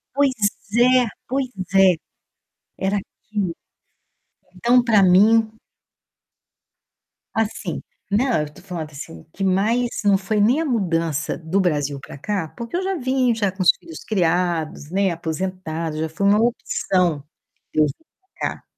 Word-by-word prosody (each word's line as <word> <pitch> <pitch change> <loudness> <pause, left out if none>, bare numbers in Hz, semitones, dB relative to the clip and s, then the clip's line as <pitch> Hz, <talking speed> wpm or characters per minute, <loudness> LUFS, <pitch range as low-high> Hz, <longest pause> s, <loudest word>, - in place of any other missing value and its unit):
Pois 275 -3 +2 0.6
é, - - +6 0.3
pois 265 -1 -1 0.4
é. - - +7 1.0
Era 200 +1 +1
aquilo. 195 -3 -5 1.0
Então, 240 +6 +4
pra 220 -5 +4
mim 215 +5 +5 1.9
Assim, 220 -1 -2 0.3
não, 225 - +2
eu 150 0 -6
tô - - -15
falando, 160 -4 -6
assim, 135 - -9
o - - -21
que 195 - -5
mais 215 +6 +2 0.2
não 200 -1 +4
foi 205 +2 0
nem 245 +9 +4
a 325 - 0
mudança 165 - 0
do 170 +4 0
Brasil 145 -5 0
pra - - -10
cá, 185 0 -2
porque 235 +6 -5
eu 370 - 0
já 385 0 -1
vim 260 -2 +1
já 205 -3 0
com 190 0 -3
os - - +5
filhos 330 -1 -11
criados, 170 -5 0
né, 195 -1 +2
aposentada, 165 -1 -4
já 160 0 -2
foi 200 +5 0
uma 205 +1 +5
opção 180 - 0 0.5
eu 155 -1 +4
vir 145 - -3 0.4
pra - - -1
cá, - - -19
195 Hz, 145 wpm, -22 LUFS, 165-230 Hz, 1.9 s, é